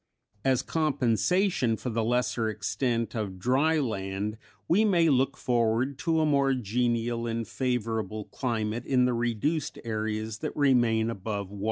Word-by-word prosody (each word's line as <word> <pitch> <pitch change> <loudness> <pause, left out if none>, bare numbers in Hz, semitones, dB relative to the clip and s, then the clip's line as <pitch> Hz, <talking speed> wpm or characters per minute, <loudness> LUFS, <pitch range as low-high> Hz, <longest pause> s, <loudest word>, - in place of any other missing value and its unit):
As 130 -2 +2
compensation 135 - +1
for 125 - -4
the 115 0 0
lesser 115 -1 0
extent 115 +3 -1
of 105 -5 -3
dry 135 - +2
land 105 -4 -2 0.3
we 195 +6 +4
may 175 -6 +4
look 135 0 +2
forward 120 +3 0
to 165 -1 +1
a - - +3
more 140 -2 +3
genial 120 0 -1
and 115 -1 -2
favorable 110 -4 -2
climate 115 -2 -2
in 125 -2 +3
the 125 - +1
reduced 120 +6 -1
areas 110 -1 -3
that - - -5
remain 120 -5 +3
above 100 -2 -4
water. 100 - -9
120 Hz, 145 wpm, -28 LUFS, 110-135 Hz, 0.3 s, we